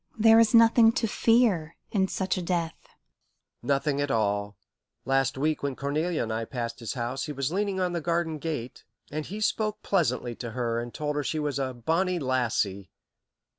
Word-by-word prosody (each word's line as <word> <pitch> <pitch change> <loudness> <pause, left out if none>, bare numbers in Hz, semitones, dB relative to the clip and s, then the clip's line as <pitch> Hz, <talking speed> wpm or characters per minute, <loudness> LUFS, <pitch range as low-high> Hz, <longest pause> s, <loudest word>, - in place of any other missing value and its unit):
"There 225 +1 +7
is 230 0 +4
nothing 230 0 +7
to 230 - 0
fear 210 -8 +2 0.2
in 190 -3 +2
such 190 0 -1
a 185 - -2
death." 170 -2 -1 0.9
"Nothing 140 +2 0
at 145 - -1
all. 105 -3 0 0.5
Last 135 0 +1
week 155 +3 0
when 140 -2 -2
Cornelia 155 +5 -1
and 110 -1 -3
I 115 +1 -2
passed 115 -2 -5
his 115 - -4
house, 120 +2 -3
he 150 - -5
was 140 0 -2
leaning 200 -1 -1
on 180 -1 0
the 170 - -2
garden 165 -1 -1
gate, 145 -6 -5 0.3
and 155 +1 -4
he 205 +3 -6
spoke 215 0 -1
pleasantly 125 -10 0
to 120 -2 -6
her 115 -2 0
and 120 0 -5
told 150 +2 -3
her 145 - 0
she 155 - -2
was 145 -2 -1
a 130 -2 -2
'bonnie 170 +9 0
lassie.' 120 - -1
150 Hz, 185 wpm, -27 LUFS, 125-185 Hz, 0.9 s, There